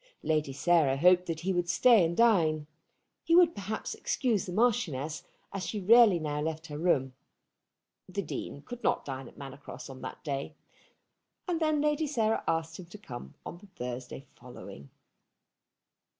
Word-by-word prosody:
Lady 155 -3 0
Sarah 145 -1 +2
hoped 180 +4 +4
that 160 -2 -3
he 190 +2 0
would 175 -1 -1
stay 230 0 +5
and 170 +1 -1
dine. 165 -10 +3 0.6
He 335 - +3
would 345 -2 +6
perhaps 205 +2 -4
excuse 230 -9 -1
the - - -5
Marchioness, 175 - 0 0.3
as 195 -2 -4
she 210 - -3
rarely 215 0 +6
now 150 -2 -3
left 160 +1 -3
her 150 -2 -7
room. 135 -6 +1 1.0
The 200 +2 -3
Dean 145 -2 -6
could 245 -1 -9
not - - +1
dine 135 -2 -6
at - - -16
Manor 135 -1 -9
Cross 140 - -10
on 130 - -11
that - - -8
day, 140 +1 -4 0.9
and 345 -3 0
then 310 -2 +1
Lady 300 +1 +1
Sarah 225 -6 0
asked 165 +1 -1
him 180 - -10
to 175 - -11
come 120 - -10
on 175 - -8
the 205 - -16
Thursday 125 -5 -7
following. 100 - -12
170 Hz, 165 wpm, -30 LUFS, 145-215 Hz, 1.0 s, would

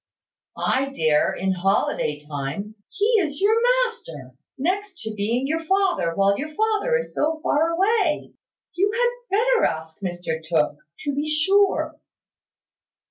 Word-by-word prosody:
"I 270 +1 +1
dare, 155 - +2
in 190 +1 -1
holiday 185 -5 0
time. 150 +8 -5 0.2
He 405 - -1
is 295 -6 -2
your 415 +3 +4 0.3
master, 160 - -9 0.3
next 375 +6 -2
to 220 - -5
being 225 +5 -1
your 320 +3 -1
father, 360 - +1
while 200 0 +2
your 305 +2 -4
father 440 +3 +1
is 485 - -6
so 315 +1 0
far 315 +3 +2
away. 380 -1 +1 0.4
You 395 +3 +1
had 485 -2 -1
better 485 +1 +3
ask 160 +2 -4
Mr 175 -4 -4
Tooke, 155 -3 +1 0.2
to 290 -2 -2
be 290 +2 -2
sure." 385 +6 +2
295 Hz, 135 wpm, -23 LUFS, -, 0.4 s, your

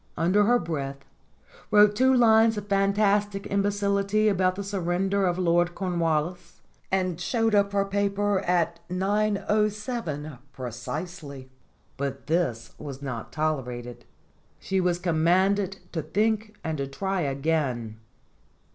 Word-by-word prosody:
under 185 +5 +3
her 240 +3 +4
breath, 140 - -4 0.6
wrote 210 0 +6
two 260 +3 +4
lines 225 -3 +5
of 205 - -4
fantastic 200 0 +1
imbecility 200 +1 +1
about 185 -2 +2
the 200 - -4
surrender 195 0 0
of 175 0 0
Lord 175 -1 +2
Cornwallis, 170 -1 -2 0.3
and 185 -2 0
showed 225 +3 +1
up 200 -1 +3
her 200 0 +1
paper 200 0 0
at 170 -2 0
9.7 205 - -1
precisely. 135 - -6 0.5
But 140 0 -4
this 150 -9 -1
was 140 -2 -8
not 125 -5 -5
tolerated. 125 -6 -3 0.5
She 190 -1 -1
was 180 -1 +1
commanded 185 +3 +2
to 165 - -2
think 215 +2 -1
and 160 -2 -3
to 140 - -2
try 190 +7 -2
again. 135 -6 -1
185 Hz, 120 wpm, -26 LUFS, 155-205 Hz, 0.6 s, wrote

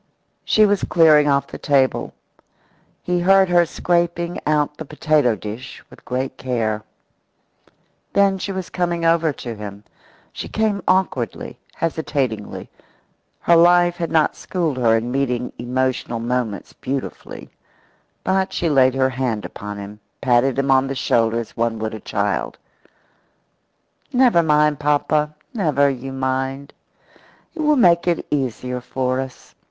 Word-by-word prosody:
She 215 - +4
was 205 -1 +1
clearing 155 -3 +5
off 140 -1 +2
the - - -10
table. 135 -3 +1 0.9
He 180 0 0
heard 190 +1 +4
her 175 -1 +4
scraping 170 +1 -1
out 150 -1 +1
the - - -6
potato 150 -5 +1
dish 110 +6 -8
with - - -16
great 130 +1 -3
care. 115 -4 -1 1.3
Then 195 -1 +3
she 195 - -3
was 190 -2 -5
coming 175 -2 -1
over 165 -1 +3
to 120 -3 -7
him. 105 -1 -8 0.5
She - - -6
came 215 -2 0
awkwardly, 185 - -1 0.2
hesitatingly 140 -9 -3 0.7
her 170 - +4
life 175 +1 +5
had 170 -2 -2
not 155 -2 +2
schooled 165 -7 -2
her 115 -3 +3
in 120 +2 -3
meeting 125 -2 -1
emotional 125 -1 -1
moments 120 -3 -3
beautifully 135 0 -6 0.7
but 190 0 0
she 170 -2 -1
laid 130 -2 +4
her 130 0 +2
hand 125 -5 -2
upon 105 0 -7
him, 100 +1 -9 0.2
patted 125 0 +2
him 135 0 +1
on 135 0 +4
the 135 - -4
shoulder 115 -2 +1
as 115 - -8
one 115 0 -1
would 110 0 -4
a 110 - -6
child. 100 -1 -2 1.5
"Never 245 -8 +4
mind, 150 -2 +2
papa 150 +1 +1 0.2
never 145 - +2
you 135 0 -6
mind. 135 +1 -3 0.8
It 335 - -12
will 300 0 +3
make 175 -9 +4
it 170 -2 0
easier 125 -2 -2
for 130 +1 -2
us. 130 -1 -8
140 Hz, 140 wpm, -20 LUFS, 125-170 Hz, 1.5 s, clearing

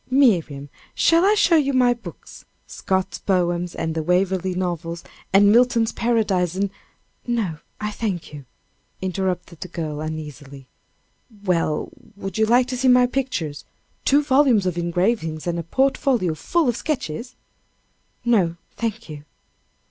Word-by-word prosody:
"Miriam, 175 - +2 0.3
shall 335 +1 +4
I 410 +2 +4
show 345 -5 +4
you 280 -2 +1
my 250 -1 +4
books 240 - -12 0.2
Scott's 190 0 -2
poems, 175 -2 0
and 160 -1 -2
the 160 - -1
Waverley 185 +2 +1
novels, 170 -2 -3 0.3
and 200 +1 +6
Milton's 235 -1 +4
Paradise, 205 -7 0
and 195 0 -1 0.3
" - - -38
"No, 210 -10 -1 0.2
I 210 0 -3
thank 195 -8 -4
you," 145 -2 -9 0.5
interrupted 185 -2 -3
the - - -5
girl, 155 -4 -5
uneasily. 150 -3 -7 0.8
"Well, 165 -4 0 0.3
would 195 0 -5
you 220 - +3
like 245 +2 +4
to 255 - -3
see 260 +1 +1
my 250 0 +6
pictures 245 - -3 0.4
two 285 +2 +4
volumes 265 -7 +4
of 180 -2 0
engravings, 175 -1 -1
and 170 -1 -1
a - - -3
portfolio 260 - +1
full 320 - 0
of 240 - +1
sketches?" 250 - -4 0.9
"No, 195 -8 +2 0.2
thank 230 0 -3
you." 150 -2 -9
190 Hz, 140 wpm, -22 LUFS, 170-240 Hz, 0.9 s, and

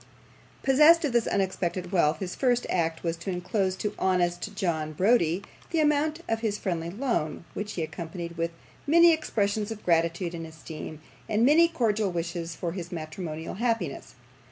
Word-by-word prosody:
Possessed 305 +5 +6
of 275 - -1
this 235 -1 +2
unexpected 185 -2 -1
wealth, 165 -5 +3
his 185 -2 -4
first 245 -2 +1
act 165 -2 0
was 165 -1 0
to 170 - -6
enclose 185 +1 -1
to 210 +2 -3
honest 175 0 0
John 160 -6 -1
Browdie 185 -1 +2 0.3
the 330 - 0
amount 305 +1 +2
of 225 0 0
his 215 -2 -1
friendly 170 -5 -2
loan, 195 - -2
which 210 0 -4
he 165 - -2
accompanied 170 +1 -6
with 165 0 -1 0.4
many 335 +2 +7
expressions 210 -8 -1
of 220 -2 -7
gratitude 170 +1 +1
and 165 -1 -5
esteem, 160 -1 -9 0.3
and 220 +2 +3
many 320 +5 +6
cordial 220 - +1
wishes 170 -1 -3
for 170 -1 -3
his 175 -1 -6
matrimonial 160 -1 -5
happiness. 225 - -2
185 Hz, 160 wpm, -27 LUFS, 170-230 Hz, 0.4 s, many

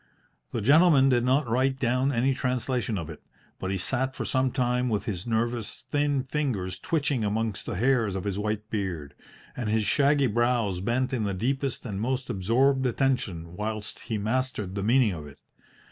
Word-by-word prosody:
The 115 - -2
gentleman 140 - +6
did 120 -2 +3
not 130 +2 +2
write 130 +3 +1
down 130 +2 +1
any 130 +1 +2
translation 125 -4 -1
of 80 -4 -4
it, 80 -2 -9 0.4
but 95 - -3
he 95 - 0
sat 130 +7 -1
for - - -3
some 130 0 +1
time 125 -1 +1
with 105 -3 -1
his 95 -1 -4
nervous, 115 +1 -2
thin 145 -2 +1
fingers 120 -11 -2
twitching 145 - 0
amongst 105 0 -2
the - - -3
hairs 115 -2 +2
of 95 - -3
his 100 -1 -2
white 105 0 -2
beard, 90 -9 -3 0.4
and 120 -4 -3
his 110 0 +2
shaggy 140 +5 +3
brows 120 -4 +1
bent 125 +7 0
in 120 -4 0
the 100 -2 -1
deepest 135 +6 -2
and 100 -4 -4
most 130 +2 -1
absorbed 130 +7 +2
attention 105 -10 -1
whilst 110 +1 -4
he 115 -2 -3
mastered 110 -2 -2
the 100 - -3
meaning 115 +2 +3
of 80 -5 -6
it. 70 - -13
120 Hz, 180 wpm, -27 LUFS, 100-130 Hz, 0.4 s, gentleman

